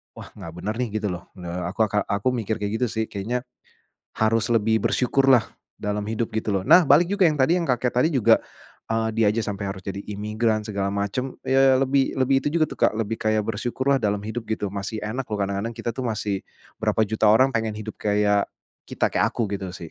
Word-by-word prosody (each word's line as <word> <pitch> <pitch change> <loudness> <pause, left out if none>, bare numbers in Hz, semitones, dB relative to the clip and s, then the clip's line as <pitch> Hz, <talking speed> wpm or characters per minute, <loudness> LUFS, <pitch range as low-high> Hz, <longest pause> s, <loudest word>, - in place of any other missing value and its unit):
wah - - -10
gak 80 - -10
bener 105 +4 -3
nih 115 -4 -2
gitu 105 - -2
loh. 90 -1 -7
Eee, 90 0 -5
aku 110 +4 +1
aka 105 0 0
aku 100 +5 0
mikir 110 -1 -2
kayak 105 +1 -2
gitu 125 - +3
sih, 110 - -1
kayaknya 120 +5 -3 0.7
harus 110 +1 +2
lebih 110 0 +2
bersyukurlah 125 0 +3 0.3
dalam 105 0 -2
hidup 115 +1 -1
gitu 110 0 -3
loh. 95 - 0
Nah, 175 - +7
balik 170 +5 +6
juga 200 -2 +3
yang 150 - -1 0.3
kakek 125 0 +1
tadi 125 +6 +3
juga, 130 -6 +4 0.5
eee, 115 0 0
dia 115 -1 +3
aja 115 - -1
sampai 100 -1 -3
harus 95 -1 -7
jadi 100 0 -4
imigran 105 +1 -1
segala 100 -2 -2
macam, 100 +6 -2
ya 135 0 +4
lebih 135 0 +1
lebih 135 0 +3
itu - - +2
juga 165 -2 +4
tuh, - - -9
Kak, - - -8
lebih 115 0 -2
kayak 110 0 +1
bersyukurlah 125 +5 0
dalam 105 -2 0
hidup 115 +1 -4
gitu, 105 -2 -2
masih 100 +2 -4
enak 120 +5 -3
loh, 105 - -2
kadang-kadang 100 +4 -2
kita 120 0 -3
tuh 130 +3 -5
masih 105 -3 -2 0.4
berapa 110 0 +1
juta 110 -1 +2
orang 130 +6 +5
pengen 110 -2 -1
hidup 110 0 -7
kayak 105 -1 +2 0.4
kita, - - 0
kayak - - +2
aku 115 - -1
gitu 95 -2 -3
sih. 85 -3 -9
110 Hz, 210 wpm, -24 LUFS, 105-125 Hz, 0.7 s, Nah